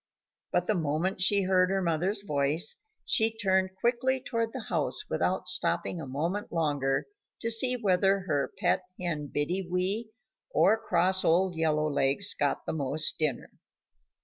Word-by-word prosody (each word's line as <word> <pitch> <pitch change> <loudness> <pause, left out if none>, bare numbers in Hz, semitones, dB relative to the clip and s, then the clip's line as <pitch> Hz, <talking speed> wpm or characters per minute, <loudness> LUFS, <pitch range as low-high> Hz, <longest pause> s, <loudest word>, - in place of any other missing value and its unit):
But 180 - +1
the 215 - +1
moment 170 +2 -1
she 200 +1 +3
heard 185 -1 +2
her 195 0 0
mother's 180 +5 0
voice, 150 +2 0 0.3
she 225 0 +1
turned 190 -2 +1
quickly 255 +3 +1
toward 230 -3 -3
the - - -7
house - - -1
without - - -1
stopping 170 - 0
a 140 - -7
moment 165 +10 -3
longer 145 -5 0 0.3
to 230 - 0
see 250 +3 +4
whether 195 -3 +2
her 145 -7 -2
pet 185 -1 +1 0.2
hen, 160 -5 -3
Biddy 155 +7 -1
Wee, 190 +5 -1 0.4
or 220 - +4
cross 185 -3 +2
old 175 +2 +2
Yellow 155 -1 +1
Legs 140 +6 +2
got 145 -1 -1
the - - -3
most 150 +1 +1
dinner. 150 -6 -2
180 Hz, 150 wpm, -28 LUFS, 155-200 Hz, 0.4 s, see